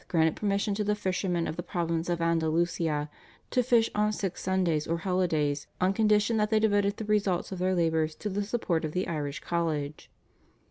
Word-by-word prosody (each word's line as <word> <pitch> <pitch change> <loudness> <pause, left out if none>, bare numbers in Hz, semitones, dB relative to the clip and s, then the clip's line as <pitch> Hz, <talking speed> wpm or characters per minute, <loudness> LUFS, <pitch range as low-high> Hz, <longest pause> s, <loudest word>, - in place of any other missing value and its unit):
granted 160 -2 +2
permission 200 0 0
to 210 +1 -1
the 210 0 +1
fishermen 180 -3 -1
of - - -3
the - - -2
province 170 -1 -2
of 175 -1 0
Andalusia 165 -2 +1 0.4
to 250 - +3
fish 235 -2 +3
on 210 0 +2
six 195 -3 -3
Sundays 180 -5 0
or 165 - 0
holidays 165 -6 0
on 185 +1 +2
condition 210 +1 +3
that 210 0 +1
they 220 -1 +3
devoted 205 -2 +2
the 220 - -5
results 205 -4 0
of 190 - -5
their 185 +1 +1
labours 160 -2 +1
to 210 - -5
the 200 +1 -1
support 200 -6 -1
of 155 -1 -3
the 185 +1 -1
Irish 145 -3 -3
College. 155 -4 -2
180 Hz, 190 wpm, -28 LUFS, 160-205 Hz, 0.4 s, to